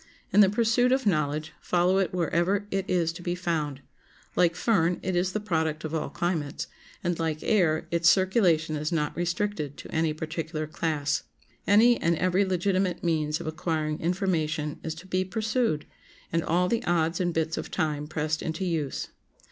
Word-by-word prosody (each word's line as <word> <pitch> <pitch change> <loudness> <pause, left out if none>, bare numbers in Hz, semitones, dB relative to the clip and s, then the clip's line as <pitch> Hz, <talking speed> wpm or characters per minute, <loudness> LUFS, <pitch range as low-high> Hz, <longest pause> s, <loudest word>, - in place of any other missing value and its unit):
In - - +5
the 195 - +6
pursuit 230 +4 +2
of 265 0 +2
knowledge 155 -4 0
follow 180 +2 +2
it 190 - +1
wherever 180 +3 +1
it 195 0 -2
is 170 -2 +1
to 175 - -9
be 175 0 -2
found; 155 -6 -2 0.5
like 170 -1 +3
fern, 180 -4 +2
it 185 -1 -1
is 180 +1 +1
the 215 - -1
product 160 -6 -1
of 155 0 -4
all 160 -3 -1
climates, 160 -3 -2 0.4
and, 175 -2 -1
like 160 -2 -2
air, 165 -7 +2
its 170 -1 +4
circulation 180 -5 +3
is 150 +2 -2
not 150 -3 -1
restricted 175 -3 -2
to - - -10
any 160 0 +2
particular 155 0 -4
class. 150 -1 -1 0.5
Any 230 +4 +5
and 170 +1 +2
every 185 +3 +2
legitimate 185 0 0
means 155 -2 0
of - - -7
acquiring 155 -1 -2
information 160 -4 -1
is 160 -1 -4
to 175 +4 -11
be 185 0 0
pursued, 215 -4 -1 0.5
and 165 0 +2
all 180 +2 +2
the 230 +4 0
odds 165 -1 +1
and 175 -1 +1
bits 160 0 -1
of - - -5
time 150 -4 -1
pressed 155 +1 -2
into 160 +4 -3
use. 160 -6 -2
170 Hz, 175 wpm, -27 LUFS, 155-185 Hz, 0.5 s, the